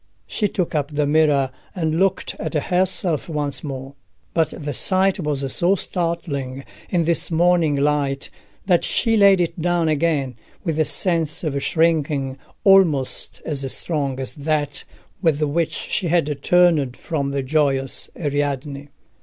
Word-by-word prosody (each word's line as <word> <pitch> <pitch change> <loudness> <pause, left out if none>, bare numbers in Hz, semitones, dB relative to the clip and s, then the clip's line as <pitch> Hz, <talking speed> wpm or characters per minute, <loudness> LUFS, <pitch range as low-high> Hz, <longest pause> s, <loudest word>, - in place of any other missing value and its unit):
She 210 - -1
took 180 -3 -2
up 145 -2 0
the 150 -1 0
mirror, 145 -3 +3 0.2
and 160 -2 -1
looked 195 0 +1
at - - -4
herself 180 +1 0
once 145 -3 -2
more. 135 -2 -6 0.4
But 160 -1 +2
the 145 0 -3
sight 190 +7 +1
was 140 -5 -2
so 180 +3 +3
startling 160 -8 -3 0.2
in 175 -2 +1
this 170 +1 +1
morning 170 -2 +3
light 140 -1 0 0.3
that 180 -3 +3
she 225 -2 +2
laid 200 -3 +6
it 170 -1 -1
down 175 -1 +1
again, 145 -5 0 0.3
with 160 -3 -2
a 155 - +3
sense 165 -3 0
of 140 -3 -1
shrinking 150 -5 +1 0.2
almost 175 -9 +3
as 135 -4 -1
strong 140 -5 -1
as 130 - -3
that 145 -1 -2 0.4
with 160 -5 +2
which 155 +2 0
she 185 - -2
had 155 -4 0
turned 165 -8 +3
from 145 -4 -2
the 140 -1 -2
joyous 135 -2 0
Ariadne. 145 -2 -2
155 Hz, 145 wpm, -21 LUFS, 140-170 Hz, 0.4 s, laid